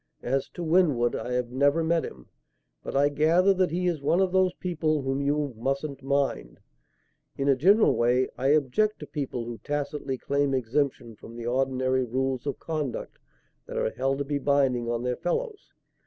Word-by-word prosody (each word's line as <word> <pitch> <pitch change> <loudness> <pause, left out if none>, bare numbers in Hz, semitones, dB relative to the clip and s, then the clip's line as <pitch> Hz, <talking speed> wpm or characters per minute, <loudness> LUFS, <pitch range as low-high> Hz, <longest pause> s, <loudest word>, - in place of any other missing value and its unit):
As 135 +2 -1
to 175 - -4
Winwood, 155 -8 +2
I 125 +2 -4
have 125 -1 -1
never 145 +5 +2
met 165 0 +1
him, 60 -2 -9 0.5
but - - -6
I 140 +1 +4
gather 165 +7 +3
that 185 -1 +1
he 180 +3 -2
is 170 -5 0
one 165 +5 +2
of 190 -1 +2
those 185 -1 +2
people 155 -5 -1
whom 135 +1 -1
you 145 -1 0
'mustn't 135 +4 -3
mind.' 135 - -1 0.8
In 140 - -1
a 140 - +5
general 195 - +4
way, 125 +2 +2
I 135 - -1
object 155 +9 +2
to - - -5
people 130 -5 -4
who 115 -1 -7
tacitly 145 -2 -3
claim 140 +1 0
exemption 130 -2 -1
from 115 - -12
the 120 -1 -7
ordinary 130 +1 +1
rules 130 +2 -2
of 140 - -3
conduct 155 -6 -4 0.5
that - - -6
are - - 0
held 135 +3 -1
to 140 - -2
be 145 0 -1
binding 130 -4 +1
on 120 0 -2
their 125 0 -1
fellows. 415 - -3
140 Hz, 185 wpm, -27 LUFS, 130-155 Hz, 0.8 s, a